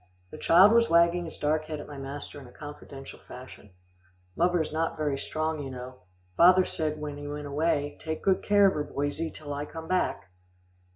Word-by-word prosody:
The - - -8
child 185 +5 +7
was 230 0 +4
wagging 170 +1 +4
his 165 - -6
dark 155 +1 0
head 155 -1 -5
at - - -8
my 145 -1 -9
master 140 +1 -7
in 130 - -12
a - - -15
confidential 140 -1 -10
fashion. 125 -4 -12 0.7
"Muvver's 175 -3 +1
not 165 +1 -1
very 150 -2 0
strong, 155 +3 -2
you 135 - -6
know. 130 0 -8 0.4
Father 185 +2 +6
said 155 -1 -2
when 150 -1 -5
he 145 0 -7
went 145 0 -5
away, 145 0 -1
'Take 160 -1 -5
good 190 -1 +2
care 205 -1 +4
of 195 - +5
her, 150 - -2
boysie, 145 +3 -3
till 145 -2 -7
I 145 +1 -4
come 160 0 -8
back. 185 - -1
155 Hz, 195 wpm, -28 LUFS, 145-170 Hz, 0.7 s, child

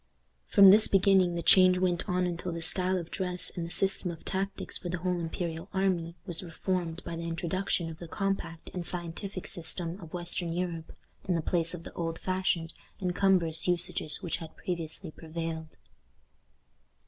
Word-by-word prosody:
From 195 -1 +9
this 210 +2 +8
beginning 190 -2 +4
the 170 - -2
change 185 -1 +7
went 180 -1 0
on 180 0 +2
until 175 0 -3
the 170 0 -4
style 185 +2 +2
of 170 -1 -5
dress 180 -2 -1
and 175 - -3
the - - -8
system 195 0 +2
of 165 -1 -8
tactics 195 +1 -3
for 175 - -5
the 180 - -1
whole 180 0 -1
imperial 165 +1 -4
army 180 -3 +1
was 175 -4 -2
reformed 175 0 -2
by 170 - -4
the 165 0 -4
introduction 170 +1 -1
of 160 -1 -8
the 170 - -7
compact 175 -3 -3
and 180 - -3
scientific 180 +2 -4
system 170 +2 -3
of 165 -2 -10
western 175 -1 -2
Europe, 170 -2 -3 0.4
in 180 - +2
the 165 - +1
place 170 0 0
of 165 - -9
the - - -9
old 165 -1 -3
fashioned 185 -3 -1 0.3
and 180 -2 -1
cumbrous 180 -5 +2
usages 175 -1 0
which 175 - -1
had 160 -1 -10
previously 170 -1 -2
prevailed. 160 0 -6
175 Hz, 175 wpm, -30 LUFS, 165-185 Hz, 0.4 s, From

